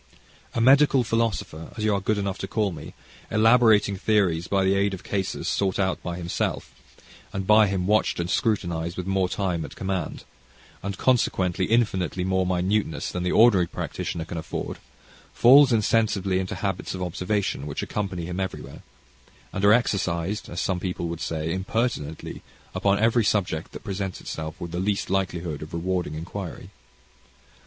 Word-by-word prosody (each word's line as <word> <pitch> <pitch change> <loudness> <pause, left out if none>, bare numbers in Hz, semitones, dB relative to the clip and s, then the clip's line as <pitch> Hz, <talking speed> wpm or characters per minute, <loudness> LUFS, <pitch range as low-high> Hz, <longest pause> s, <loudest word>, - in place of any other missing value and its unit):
A - - +1
medical 135 +2 +5
philosopher, 110 -9 -2
as 105 - -3
you 110 -1 +2
are 100 - 0
good 105 +2 0
enough 100 -2 -2
to 95 - -4
call 105 0 0
me, 80 -4 -9 0.3
elaborating 110 -2 +4
theories 95 -5 +1
by 100 -1 +2
the 95 +1 +3
aid 100 0 +1
of 95 - -13
cases 95 -2 -3
sought 95 -2 0
out 95 -2 0
by 85 -1 -4
himself, 85 -1 -2 0.6
and 95 -1 -3
by 105 +1 +6
him 95 -2 -1
watched 105 -1 +2
and 85 - -1
scrutinised 85 -5 -1
with 90 - -3
more 95 -1 +1
time 90 -5 -1
at - - -9
command, 95 -4 -3 0.6
and 100 -1 -4
consequently 95 -8 +1
infinitely 95 -6 +1
more 95 0 +1
minuteness 90 0 0
than 90 - -3
the 90 - 0
ordinary 105 -6 +5
practitioner 80 0 -4
can 85 0 -5
afford, - - -5 0.6
falls 135 +3 +7
insensibly 105 -4 +2
into 95 0 -3
habits 95 -1 -3
of 90 - -4
observation, 90 -3 -2
which 70 - -4
accompany 95 -5 -3
him 90 +2 -4
everywhere, 95 -1 -5 0.7
and 95 - -3
are 100 - +7
exercised, 100 -4 0
as 85 - -5
some 95 -2 0
people 90 -2 -3
would 85 0 -5
say, 80 0 -2
impertinently, 95 - -2 0.3
upon 100 0 +2
every 115 +2 +3
subject 90 -6 0
that - - -9
presents 95 -2 -4
itself 80 -1 -6
with 85 - -6
the 85 - -3
least 100 0 -1
likelihood 85 -5 -1
of 75 +1 -9
rewarding 90 -2 -2
inquiry. 90 +3 -7
95 Hz, 165 wpm, -25 LUFS, 90-105 Hz, 0.7 s, falls